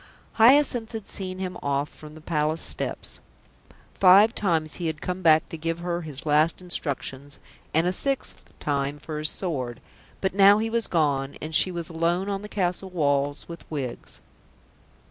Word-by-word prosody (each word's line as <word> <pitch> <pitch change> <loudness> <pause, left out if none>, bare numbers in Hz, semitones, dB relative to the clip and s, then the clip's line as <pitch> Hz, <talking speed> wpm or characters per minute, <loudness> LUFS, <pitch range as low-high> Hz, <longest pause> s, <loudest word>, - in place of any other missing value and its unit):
Hyacinth 245 -1 +4
had 220 -3 -6
seen 185 -1 -4
him 185 -1 -5
off 140 +1 -1
from 155 0 -13
the 155 - -12
Palace 155 0 -1
steps. - - -3 0.8
Five 200 +4 +7
times 165 -6 0
he 170 - -1
had 160 -1 -3
come 180 +1 -4
back 160 -2 +4
to 165 - -6
give 165 +1 -2
her 175 0 -3
his 150 -4 -7
last 155 +2 +2
instructions, 145 -5 -1 0.3
and 160 +2 +2
a 180 - +2
sixth 275 +7 -2
time 140 0 -1
for 150 +1 -6
his 155 0 +4
sword, 130 - -3 0.4
but 190 - -1
now 200 +1 +7
he 225 +1 -2
was 230 -1 0
gone, 140 -4 0
and 155 +1 -7
she 185 - +4
was 170 -2 -4
alone 170 +4 0
on 195 -1 -2
the 210 - -9
castle 190 -1 -1
walls 145 -4 0
with 170 -1 -9
Wiggs. 135 -6 -6
165 Hz, 170 wpm, -25 LUFS, 150-190 Hz, 0.8 s, Five